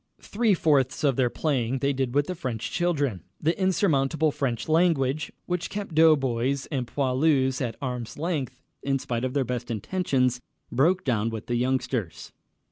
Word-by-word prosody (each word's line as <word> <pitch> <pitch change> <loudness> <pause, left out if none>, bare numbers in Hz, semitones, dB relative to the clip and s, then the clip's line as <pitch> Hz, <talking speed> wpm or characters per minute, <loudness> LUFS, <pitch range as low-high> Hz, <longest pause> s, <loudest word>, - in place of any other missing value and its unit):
Three 215 -1 +2
fourths 145 -5 +2
of 140 -3 +3
their 125 -1 +2
playing 130 -3 -1
they 140 +2 0
did 130 -1 -2
with 145 0 +3
the 185 - -3
French 125 -9 -4
children. 145 - 0 0.2
The 160 +2 +1
insurmountable 160 -5 +2
French 125 -5 -2
language, 155 -4 +2
which 180 -1 -2
kept 205 -4 -5
doughboys 135 -4 +3
and 130 -4 -2
poilus 130 0 +1
at 120 -3 -2
arm's 125 -3 -4
length 145 -6 -3 0.2
in 135 0 0
spite 120 -2 -3
of 130 +1 -2
their 135 -2 +2
best 125 0 -4
intentions, 125 - 0 0.3
broke 175 +9 +2
down 115 -4 0
with 110 -2 -6
the 120 - -1
youngsters. 125 -5 -2
135 Hz, 160 wpm, -26 LUFS, 125-155 Hz, 0.3 s, of